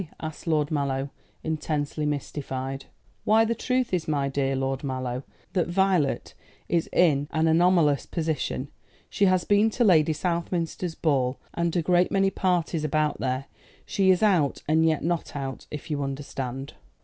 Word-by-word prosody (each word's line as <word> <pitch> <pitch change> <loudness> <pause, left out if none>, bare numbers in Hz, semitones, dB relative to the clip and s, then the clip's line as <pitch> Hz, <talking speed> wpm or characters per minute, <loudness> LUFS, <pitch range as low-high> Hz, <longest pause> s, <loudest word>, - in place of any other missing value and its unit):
asked 155 +1 -7
Lord 150 -2 +1
Mallow, 140 -2 -1 0.3
intensely 155 -1 -2
mystified. 135 -2 -4 0.4
"Why, 220 +1 +4
the 230 - +1
truth 250 0 -1
is, 175 -3 0
my 140 -3 0
dear 135 0 0
Lord 135 +1 -2
Mallow, 130 -2 -3 0.3
that 180 -3 +1
Violet 180 -4 +1 0.3
is 170 -2 0
in 145 -5 +3
an 160 0 +1
anomalous 165 -3 +3
position. 155 -4 -2 0.4
She 200 - +2
has 185 -2 +3
been 205 +2 +4
to 240 +3 0
Lady 160 -7 +5
Southminster's 170 +1 -2
ball, 130 -5 +1 0.2
and 170 0 -1
a 175 - +1
great 180 +1 +3
many 195 0 +2
parties 175 -4 0
about 155 0 0
here. 130 +1 -1 0.4
She 195 -1 +1
is 185 +2 +4
out 175 -10 +2
and 160 +2 +3
yet 155 -2 +1
not 170 -1 -2
out, 135 -2 -5
if 150 +2 -7
you 145 -1 -1
understand." 135 -1 -5
155 Hz, 155 wpm, -26 LUFS, 140-180 Hz, 0.4 s, Lady